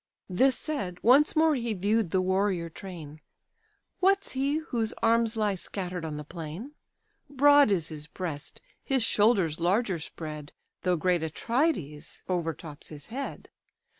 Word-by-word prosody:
This 260 +9 +3
said, 200 - -3
once 275 +6 +5
more 315 0 +4
he 235 -5 -1
view'd 205 +1 +1
the 185 +2 +2
warrior 185 -3 0
train; 155 -5 -9 0.8
"What's 390 +1 +2
he, 275 +2 0
whose 240 -9 -2
arms 230 0 +3
lie 210 -2 +2
scatter'd 180 -1 -5
on 155 -2 -4
the 150 - -5
plain? 165 - -7 0.6
Broad 285 -1 +6
is 175 -6 +1
his 150 -2 -7
breast, 160 -4 -5 0.2
his 265 -3 +1
shoulders 205 -8 +3
larger 185 +1 +1
spread, 150 -1 -7 0.3
Though 180 -1 +2
great 175 +1 +1
Atrides 165 - -2
overtops 165 -4 -3
his 150 -2 -10
head. 275 +2 -5
190 Hz, 135 wpm, -28 LUFS, 165-245 Hz, 0.8 s, Broad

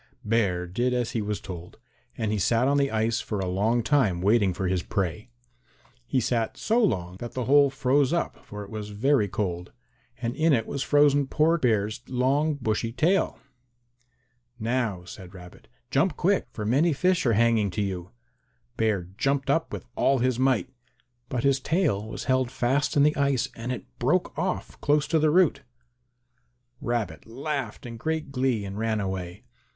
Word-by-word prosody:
Bear 100 -5 +1
did 120 +8 -1
as 120 -2 -1
he 115 - -1
was 105 0 -2
told, 90 -2 -9 0.4
and 110 -2 -1
he 105 - 0
sat 115 +6 +2
on 140 +1 +3
the 140 -1 +2
ice 110 0 0
for 105 - -4
a 95 - -1
long 105 +6 +1
time 110 -11 +2
waiting 100 +1 +3
for 95 +1 -2
his 90 -1 0
prey. 95 +5 -3 0.8
He 130 - +1
sat 115 -1 -1
so 230 +2 +2
long 90 - -1
that 120 +3 -7
the 125 -2 -2
hole 140 +2 +5
froze 135 +1 +2
up, 170 0 -2
for 105 0 -8
it 100 - -12
was 105 -1 -5
very 110 +2 +2
cold, 90 -3 -3 0.5
and 120 0 -3
in 160 0 +3
it 115 -4 +2
was 140 - -4
frozen 145 -1 +4
poor 160 +4 +2
Bear's 110 -3 +1
long 135 +5 +1
bushy 115 -3 -1
tail. 165 +10 +1 1.2
"Now," 115 -5 -1
said 90 +1 -11
Rabbit, 90 -1 -13 0.2
"jump 160 +7 +2
quick, 195 +2 +1
for 105 - -6
many 145 +9 +3
fish 180 +4 +2
are 115 - +3
hanging 115 -2 +3
to 100 +3 -2
you." 95 -2 -4 0.7
Bear 110 -5 +1 0.2
jumped 135 +1 +1 0.2
with - - -6
all 135 - +3
his 125 -1 0
might, 130 -7 +1 0.6
but 125 -2 -2
his 140 -1 +3
tail 145 - 0
was - - -6
held 130 -2 +1
fast 135 +4 0
in 140 - +6
the 150 +1 +3
ice 140 -3 +1
and 115 +2 -4
it 125 - -5
broke 155 +9 +1
off 180 +4 -3
close 150 0 +2
to 160 - +3
the 155 0 +3
root. 170 -3 +3 1.2
Rabbit 110 -11 -3
laughed 135 -1 -4
in 115 -1 -7
great 160 +2 -3
glee 125 -5 0
and 100 +1 -6
ran 110 -1 0
away. 95 +1 -4
120 Hz, 175 wpm, -26 LUFS, 105-140 Hz, 1.2 s, in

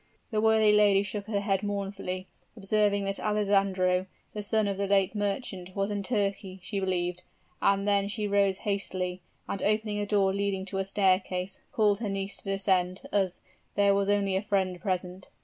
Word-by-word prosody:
"The 215 -1 +1
worthy 220 -1 +5
lady 205 -1 +5
shook 200 +1 -5
her 205 -2 -1
head 195 -2 0
mournfully, 195 -2 -3 0.3
observing 205 0 +1
that 195 0 -2
Alessandro, 195 -3 +1 0.3
the 210 - -4
son 215 0 +1
of 200 -1 -2
the 200 - 0
late 195 0 +3
merchant, 195 -3 -3
was 200 +1 -1
in 205 -1 -2
Turkey, 195 -3 -2
she 200 +1 -2
believed; 180 -2 -1 0.4
and 200 0 +2
then 200 -1 +3
she 210 0 -2
rose 200 -1 +2
hastily, 185 -3 -2 0.3
and 195 - -3
opening 215 0 +1
a 205 - -2
door 195 -2 +2
leading 200 -1 -1
to 195 0 -3
a - - +1
staircase, 190 -1 0
called 210 -6 +2
her 220 -3 -2
niece 195 0 -3
to - - -11
descend, 190 -2 +1
as 190 -3 0 0.3
'there 200 -1 +4
was 200 0 +1
only 200 -2 +2
a 190 - +1
friend 190 -3 -1
present.' 185 -1 -3
200 Hz, 180 wpm, -28 LUFS, 190-205 Hz, 0.4 s, worthy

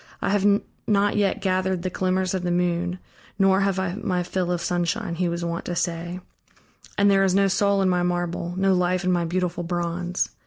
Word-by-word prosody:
"I - - -1
have 205 0 +3 0.2
not 205 -1 +2
yet 205 -2 +1
gathered 185 -1 0
the 185 - -2
glimmers 185 0 0
of 190 - -1
the 175 - -2
moon, 175 0 0 0.4
nor 195 0 +4
have 195 -1 +1
I 190 -2 -1
my 180 -3 -1
fill 180 0 -2
of 175 - 0
sunshine," 175 +3 -1
he 175 +1 0
was 170 0 -3
wont 170 0 -3
to 175 - -3
say, 170 +1 -3 0.8
"and 200 0 +4
there 195 0 +4
is 190 -1 +2
no 200 0 +4
soul 200 0 +2
in - - +2
my 180 -1 +2
marble, 175 0 -2
no 195 0 +3
life 180 0 +1
in 185 - +1
my 175 -1 +1
beautiful 175 0 -2
bronze." 175 +1 -2
180 Hz, 205 wpm, -24 LUFS, 175-195 Hz, 0.8 s, nor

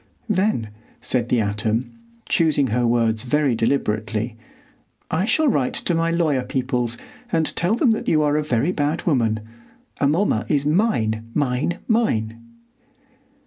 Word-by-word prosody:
"Then," 185 - 0 0.3
said 120 -2 -1
the 120 - +2
atom, 110 +3 -1 0.4
choosing 155 -4 +2
her 120 0 +2
words 115 -2 +1
very 140 +2 +1
deliberately, 110 -2 -1 0.8
"I 170 +5 +1
shall 310 +7 +2
write 140 - +1
to 175 - 0
my 165 0 +1
lawyer 160 -6 +1
peoples 125 -2 -1 0.3
and 160 -1 0
tell 180 +6 +1
them 245 -1 +3
that 220 - -2
you 155 -1 +3
are 145 0 +2
a 155 - +2
very 140 +3 +1
bad 150 -1 -1
woman. 115 -9 +1 0.6
Amomma 145 - +1
is 145 -1 +1
mine, 115 - +1
mine, 145 +4 0
mine!" 115 - 0
135 Hz, 140 wpm, -22 LUFS, 115-165 Hz, 0.8 s, them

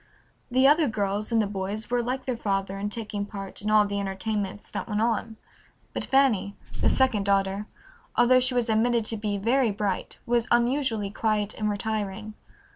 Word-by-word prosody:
The 260 +2 +4
other 300 +1 +5
girls 205 -1 -1
and 230 - +3
the 215 - +3
boys 200 +3 -4
were 245 0 +2
like 255 +2 -3
their 255 - -1
father 195 -3 -2
in 205 +1 -2
taking 210 -2 -4
part 200 -1 -7
in 210 - -2
all 215 -1 +5
the 200 0 -2
entertainments 200 +1 -3
that - - -4
went 210 -1 0
on, 225 0 0 0.6
but - - -3
Fanny, 240 -8 +2 0.3
the - - +4
second 260 -6 +2
daughter, 195 +1 +1 0.5
although 255 +1 +5
she 255 0 +2
was 245 -1 +1
admitted 230 +1 +2
to 225 - -2
be 205 -1 -2
very 235 +4 +2
bright, 205 -2 -2
was 235 -1 +1
unusually 240 -4 +1
quiet 210 -1 0
and 215 -1 -2
retiring. 210 0 -3
215 Hz, 180 wpm, -26 LUFS, 200-240 Hz, 0.6 s, other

